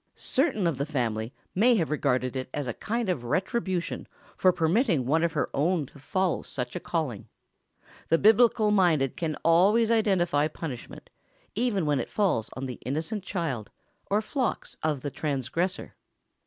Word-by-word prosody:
Certain 255 - 0
of 165 -6 +1
the 140 - 0
family 115 -6 -1 0.2
may 235 +6 +4
have 165 -8 0
regarded 130 -3 0
it 130 -1 -3
as 145 - -2
a 120 - -3
kind 230 - -2
of 175 -10 -1
retribution 185 - -2 0.3
for 185 - +4
permitting 170 - +2
one 160 +6 +2
of 170 -2 +1
her - - 0
own 160 +1 +1
to 140 - -16
follow 185 +5 0
such 125 -2 -4
a - - -2
calling. 150 - -3 0.8
The 165 - +4
biblical 220 +1 +5
minded 170 -9 +3
can 165 -4 -2
always 200 +8 +5
identify 175 -9 +2
punishment, 150 -5 -8 0.4
even 210 -6 0
when 145 -2 +2
it 120 - -4
falls 185 - +1
on 135 - -5
the 125 -2 -6
innocent 160 - -3
child, 155 - -3 0.4
or 210 +2 +2
flocks, 255 +1 -2
of 150 -4 -1
the 145 - -4
transgressor. 155 +7 -2
165 Hz, 160 wpm, -27 LUFS, 135-195 Hz, 0.8 s, biblical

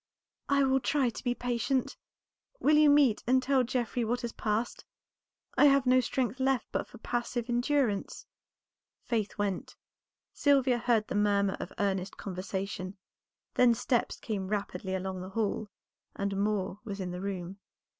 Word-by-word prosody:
"I 280 0 +4
will 265 0 +3
try 265 -2 +1
to - - -9
be 245 -1 0
patient. 245 +2 -1 0.6
Will 300 +2 +4
you 300 0 +6
meet 285 -6 +5
and 255 +2 +5
tell 265 0 +3
Geoffrey 245 0 -1
what 240 +2 -1
has 235 -2 -3
passed? 220 +2 -2 0.7
I - - +6
have 275 -2 +5
no 255 0 +5
strength 250 0 -1
left 265 -2 +1
but - - -2
for - - -13
passive 240 +1 -2
endurance." 245 -3 0 0.8
Faith 220 -4 -2
went; 200 -3 -2 0.6
Sylvia 265 -4 +3
heard 230 -3 +2
the - - -4
murmur 200 -1 +2
of - - -6
earnest 195 -1 -1
conversation; 190 0 -4 0.6
then 245 -2 +5
steps 240 +1 0
came 200 -4 -3
rapidly 200 -2 -3
along 190 0 -4
the 185 - -7
hall, 210 0 -2 0.5
and 200 0 -2
Moor 200 -1 -1
was 205 -3 -6
in 185 -2 -3
the 180 +1 -5
room. 190 -1 -5
225 Hz, 155 wpm, -30 LUFS, 200-255 Hz, 0.8 s, you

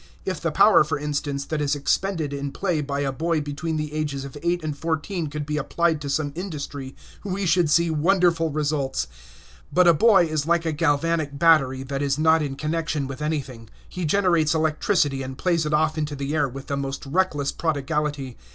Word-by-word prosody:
If 185 -4 -3
the 165 - 0
power, 205 +3 +6
for 150 - -2
instance, 145 -1 -3
that 155 0 -2
is 145 0 +1
expended 155 +1 -1
in 140 0 -4
play 180 -4 -1
by 140 0 -3
a 140 -1 0
boy 165 +4 0
between 150 +2 -3
the 150 -1 -4
ages 145 -3 -3
of 140 - -9
eight 175 0 0
and 155 -2 -3
fourteen 165 +3 -2
could 145 0 -5
be 150 0 -2
applied 160 +2 0
to 140 - -4
some 145 +1 -1
industry, 145 -6 -6 0.3
we 195 0 -2
should 170 -2 +3
see 170 +2 +3
wonderful 170 0 +2
results. 145 - -1 0.7
But 180 0 +4
a 170 - +8
boy 195 +1 +5
is 155 -2 -2
like 170 0 +2
a 160 - +1
galvanic 155 -1 0
battery 140 -5 +4
that 135 +1 -4
is 140 -1 0
not 160 +1 +4
in 140 -2 -3
connection 155 -1 -2
with 135 +2 -7
anything; 135 -7 -4 0.2
he 180 - -6
generates 170 -3 +2
electricity 155 -2 +1
and 130 0 -6
plays 170 -3 +1
it - - -2
off 155 +1 +2
into 150 -1 -2
the 140 +1 -3
air 145 -3 +1
with 135 +2 -8
the 140 - -3
most 140 0 -4
reckless 145 -2 0
prodigality. 145 -4 -2
150 Hz, 195 wpm, -24 LUFS, 140-165 Hz, 0.7 s, a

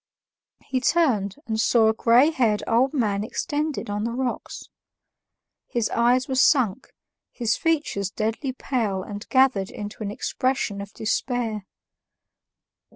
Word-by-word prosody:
He 260 -2 -1
turned, 240 - +2
and 220 -1 -2
saw 225 -1 +4
a - - +2
gray 240 +7 +4
haired 230 -8 +1
old 245 +4 +2
man 210 -8 0
extended 295 +6 -3
on 205 0 -2
the 230 - -1
rocks. 255 -1 -4 1.0
His 235 -2 -1
eyes 245 +2 +2
were 265 - -3
sunk, 260 -4 +3 0.4
his 235 -3 0
features 295 - 0
deadly 225 +6 -2
pale 225 -7 -2
and 205 +2 -8
gathered 260 -8 +3
into 210 +1 -8
an 205 - -2
expression 210 -1 -2
of 200 0 -8
despair. 220 -2 -2
235 Hz, 130 wpm, -24 LUFS, 210-260 Hz, 1.0 s, saw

